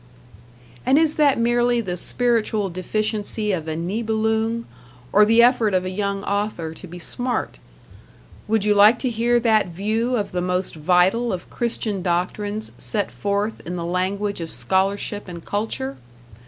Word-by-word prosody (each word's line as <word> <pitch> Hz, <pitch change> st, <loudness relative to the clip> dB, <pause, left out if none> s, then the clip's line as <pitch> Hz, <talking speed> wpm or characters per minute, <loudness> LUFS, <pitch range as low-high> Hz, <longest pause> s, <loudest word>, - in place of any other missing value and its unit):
And 265 Hz, +2 st, +4 dB
is 315 Hz, -1 st, +4 dB
that 290 Hz, -3 st, +4 dB
merely 240 Hz, +1 st, +2 dB
the 185 Hz, -6 st, -3 dB
spiritual 220 Hz, -1 st, 0 dB
deficiency 210 Hz, +3 st, -2 dB
of 165 Hz, -4 st, -3 dB
a 160 Hz, -, -2 dB
Nibelung 220 Hz, +5 st, -1 dB, 0.5 s
or 210 Hz, +1 st, +7 dB
the 225 Hz, +2 st, +5 dB
effort 235 Hz, -5 st, +3 dB
of 185 Hz, 0 st, +1 dB
a 185 Hz, -, -3 dB
young 200 Hz, 0 st, -2 dB
author 200 Hz, -6 st, -2 dB
to 185 Hz, -, -11 dB
be 175 Hz, +1 st, -9 dB
smart? 245 Hz, +8 st, -2 dB, 0.9 s
Would 215 Hz, -1 st, +1 dB
you 210 Hz, -, +4 dB
like 210 Hz, +3 st, +6 dB
to 255 Hz, -1 st, -2 dB
hear 235 Hz, +1 st, +2 dB
that 220 Hz, -4 st, +3 dB
view 215 Hz, +8 st, -1 dB
of 205 Hz, -4 st, -2 dB
the 180 Hz, -, -1 dB
most 180 Hz, +1 st, -1 dB
vital 180 Hz, +9 st, +2 dB
of 180 Hz, -1 st, -6 dB
Christian 225 Hz, -4 st, -2 dB
doctrines 205 Hz, +4 st, -1 dB
set 205 Hz, -3 st, -1 dB
forth 205 Hz, +2 st, -2 dB
in 175 Hz, -, -5 dB
the 170 Hz, -1 st, -4 dB
language 190 Hz, +3 st, -1 dB
of 165 Hz, -, -5 dB
scholarship 190 Hz, -, -1 dB
and 170 Hz, -2 st, -9 dB
culture? 170 Hz, -11 st, -3 dB
205 Hz, 155 wpm, -22 LUFS, 180-225 Hz, 0.9 s, or